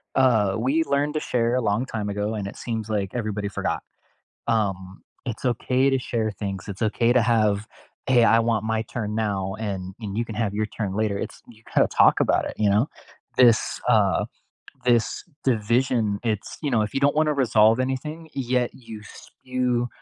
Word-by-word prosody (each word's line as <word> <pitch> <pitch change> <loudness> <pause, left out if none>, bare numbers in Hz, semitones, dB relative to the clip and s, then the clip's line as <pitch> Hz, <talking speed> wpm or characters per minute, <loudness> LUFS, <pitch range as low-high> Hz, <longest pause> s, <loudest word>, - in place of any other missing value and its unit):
uh, 110 -7 +3
"We 135 +8 +2
learned 145 +1 0
to - - +2
share 120 0 +2
a 130 - +1
long 105 +5 0
time 110 -5 -4
ago, 105 0 -2
and 100 - -3
it 100 - -9
seems 110 -2 -4
like 100 -3 -1
everybody 105 -3 -2
forgot." - - -2 0.7
Um, 95 -3 -2 0.3
it's - - -16
okay 130 +2 +2
to 135 - +2
share 115 -3 -1
things, 100 -1 -5
it's 100 -2 -7
okay 115 +2 +2
to 125 - +4
have 105 -3 +2 0.4
"Hey, 125 -3 +5
I 115 - +5
want 115 -2 0
my 110 0 0
turn 105 -3 -2
now, 105 -3 0 0.3
and 95 -2 -3 0.2
and 105 -3 -5
you 115 - +1
can 110 - -7
have 100 -3 -2
your 110 - +1
turn 100 -4 -2
later." 105 -1 0
It's - - -12
you 110 - -22
gotta - - +4
talk - - +5
about - - +2
it, - - -5
you 105 -2 +3
know? 105 +7 +3 0.5
This, 120 -3 +4 0.2
uh, 100 -4 +2 0.6
this 120 -2 +2 0.2
division, 115 -2 +1
it's 110 -3 -3
you 145 - -1
know, 115 -3 +3
if 105 - -5
you 135 - 0
don't 140 +1 +3
wanna 155 0 +3
resolve 115 -4 +4
anything, 150 +5 -3
yet 125 -2 0
you 115 -4 -10
spew 125 +2 -3
115 Hz, 190 wpm, -24 LUFS, 105-125 Hz, 0.7 s, Hey